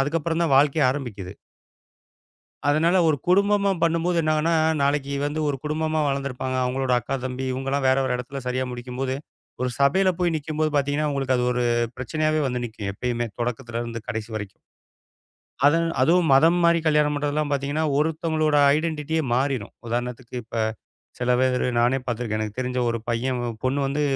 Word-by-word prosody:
அதுக்கப்புறம் 165 Hz, +3 st, -1 dB
தான் 150 Hz, -5 st, +2 dB
வாழ்க்கையே 145 Hz, +1 st, +4 dB
ஆரம்பிக்குது. 115 Hz, -9 st, -5 dB, 1.3 s
அதனால 160 Hz, +5 st, +3 dB
ஒரு 155 Hz, -, +2 dB
குடும்பமா 200 Hz, +1 st, +3 dB
பண்ணும்போது 170 Hz, +1 st, +1 dB
என்னாகும்ன்னா, 155 Hz, +1 st, +1 dB, 0.3 s
நாளைக்கு 140 Hz, 0 st, 0 dB
வந்து 150 Hz, +2 st, -3 dB
ஒரு 140 Hz, -, -1 dB
குடும்பமா 155 Hz, +1 st, -1 dB
வளர்ந்துருப்பாங்க. 130 Hz, -2 st, -2 dB
அவங்களோட 130 Hz, 0 st, -1 dB
அக்கா, 135 Hz, -, -3 dB
தம்பி 130 Hz, +1 st, -4 dB
இவங்கல்லாம் 135 Hz, +1 st, -1 dB
வேற 130 Hz, -, +4 dB
ஒரு 125 Hz, -, 0 dB
எடத்துல 130 Hz, +2 st, -6 dB
சரியா 130 Hz, +1 st, -1 dB
முடிக்கும்போது, 125 Hz, +2 st, -4 dB, 0.5 s
ஒரு 125 Hz, -, 0 dB
சபையில 185 Hz, +7 st, +4 dB
போய் 175 Hz, -2 st, +1 dB
நிக்கும்போது 155 Hz, 0 st, -2 dB
பாத்தீங்கன்னா, 145 Hz, +2 st, +1 dB
உங்களுக்கு 135 Hz, -2 st, 0 dB
அது 125 Hz, -, +1 dB
ஒரு 125 Hz, 0 st, 0 dB, 0.3 s
பிரச்சனையாவே 155 Hz, +4 st, 0 dB
வந்து 125 Hz, -1 st, -3 dB
நிக்கும், 110 Hz, -3 st, -6 dB
எப்பயுமே. 120 Hz, +2 st, -2 dB
தொடக்கத்துலருந்து 120 Hz, -1 st, -4 dB
கடைசி 110 Hz, +1 st, -4 dB
வரைக்கும். 105 Hz, -2 st, -7 dB, 1.1 s
அது 145 Hz, +3 st, +5 dB, 0.2 s
அதுவும் 165 Hz, +3 st, +3 dB
மதம் 165 Hz, +5 st, +5 dB
மாறி 170 Hz, 0 st, +4 dB
கல்யாணம் 150 Hz, -1 st, +3 dB
பண்றதெல்லாம் 145 Hz, +1 st, -1 dB
பார்த்தீங்கன்னா, 145 Hz, +3 st, -1 dB
ஒருத்தங்களோட 155 Hz, -1 st, +1 dB, 0.2 s
ஐடன்டிட்டியே 160 Hz, 0 st, -1 dB
மாறிரும். 130 Hz, -4 st, -1 dB
உதாரணத்துக்கு 120 Hz, +1 st, -4 dB
இப்ப 115 Hz, +1 st, -9 dB, 0.6 s
சில 125 Hz, 0 st, +1 dB
பேரு 130 Hz, -1 st, +1 dB
நானே 120 Hz, +3 st, +3 dB
பாத்திருக்கேன். 115 Hz, -3 st, -2 dB
எனக்குத் 110 Hz, +3 st, -4 dB
தெரிஞ்ச 125 Hz, 0 st, -2 dB
ஒரு 115 Hz, 0 st, -2 dB
பையன். 125 Hz, +2 st, -1 dB, 0.2 s
பொண்ணு 130 Hz, +2 st, +1 dB
வந்து 145 Hz, +2 st, -1 dB
140 Hz, 150 wpm, -24 LUFS, 125-155 Hz, 1.3 s, அது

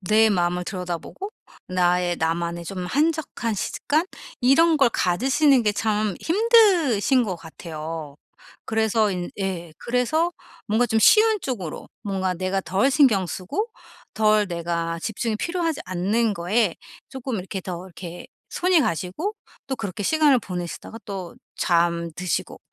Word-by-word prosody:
내 215 Hz, +3 st, +4 dB
마음을 180 Hz, -1 st, 0 dB
들여다보고 180 Hz, -, -5 dB, 0.4 s
나의 180 Hz, -1 st, +2 dB
나만의 170 Hz, +1 st, -1 dB
좀 180 Hz, 0 st, -5 dB
한적한 295 Hz, -, 0 dB
시 -, -, -2 dB
습관 315 Hz, +5 st, 0 dB, 0.3 s
이런 315 Hz, +6 st, +5 dB
걸 270 Hz, -4 st, +5 dB
가지시는 260 Hz, -, +3 dB
게 210 Hz, -, +2 dB
참 210 Hz, -2 st, 0 dB
힘드신 340 Hz, -, +4 dB
것 190 Hz, -6 st, -3 dB
같아요. 160 Hz, -2 st, -7 dB, 0.5 s
그래서 220 Hz, -1 st, +1 dB
인 180 Hz, -2 st, -4 dB
예. 180 Hz, -4 st, -3 dB
그래서 305 Hz, +8 st, 0 dB, 0.3 s
뭔가 225 Hz, +3 st, +2 dB
좀 225 Hz, -1 st, +1 dB
쉬운 435 Hz, -, +6 dB
쪽으로 195 Hz, -, -5 dB
뭔가 190 Hz, -3 st, -1 dB
내가 185 Hz, +2 st, -1 dB
덜 200 Hz, +9 st, +2 dB
신경 245 Hz, -, +4 dB
쓰고 195 Hz, -, -3 dB, 0.5 s
덜 215 Hz, -1 st, +3 dB
내가 170 Hz, -1 st, -2 dB
집중이 220 Hz, +2 st, -2 dB
필요하지 335 Hz, +1 st, -2 dB
않는 200 Hz, +5 st, 0 dB
거에 190 Hz, +2 st, +1 dB, 0.3 s
조금 265 Hz, -2 st, -5 dB
이렇게 190 Hz, +1 st, -5 dB
더 180 Hz, -1 st, -6 dB
이렇게 175 Hz, -1 st, -9 dB, 0.2 s
손이 360 Hz, -2 st, +3 dB
가시고 220 Hz, -, -2 dB, 0.3 s
또 265 Hz, -1 st, -3 dB
그렇게 200 Hz, -1 st, -5 dB
시간을 295 Hz, +1 st, +4 dB
보내시다가 180 Hz, +3 st, -6 dB
또 190 Hz, -4 st, -6 dB, 0.2 s
잠드시고 170 Hz, 0 st, 0 dB
205 Hz, 280 characters per minute, -24 LUFS, 175-265 Hz, 0.5 s, 쉬운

